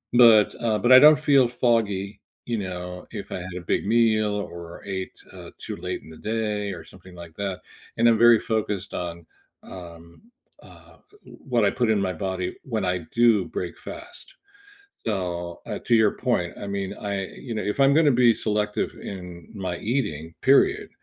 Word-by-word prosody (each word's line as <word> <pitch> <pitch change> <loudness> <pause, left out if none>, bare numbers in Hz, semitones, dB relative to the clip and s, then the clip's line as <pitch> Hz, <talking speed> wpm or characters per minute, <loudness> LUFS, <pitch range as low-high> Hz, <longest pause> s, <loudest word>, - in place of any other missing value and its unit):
But, 115 -4 +6
uh, 110 -2 +2
but 120 - +2
I 130 - +11
don't 150 +1 +7
feel 135 -4 +4
foggy, 110 -5 0 0.3
you 120 -2 -2
know, 90 -1 -6
if - - -7
I - - -3
had 90 0 -7
a - - -6
big 85 - -1
meal 110 -2 +2
or 85 -4 -8
ate, 95 -1 -5 0.2
uh, - - -10
too - - -6
late 90 +1 -5
in - - -14
the 80 - -12
day 105 -2 -2
or 85 - -9
something 90 0 -16
like 85 -2 -11
that. 100 -2 -4 0.4
And 115 +1 +4
I'm 115 -1 +5
very 120 0 +6
focused 105 -3 -3
on, 85 -1 -5 0.4
um, 85 -2 -12 0.4
uh, - - -17 0.3
w - - -14 0.2
what 115 -3 +4
I - - +4
put 120 -3 0
in 105 - +2
my 95 -1 -1
body 90 +1 -3
when 110 -7 -2
I 90 0 0
do 115 -5 +4
break 90 -2 -5
fast. 355 +2 -11 0.7
So 90 -4 -3
uh, - - -5
to 120 - +5
your 110 -2 +4
point, 120 -9 -1
I - - -5
mean, 100 0 -3
I 100 -2 -3 0.2
you 115 - -3
know, 105 - -2
if 105 +6 -3
I'm 135 0 +5
gonna 150 -2 +5
be 115 - +7
selective 105 -1 -1
in 90 -3 -9
my 95 -4 -4
eating, 90 - -3
period, - - +3
100 Hz, 185 wpm, -24 LUFS, 90-115 Hz, 0.7 s, I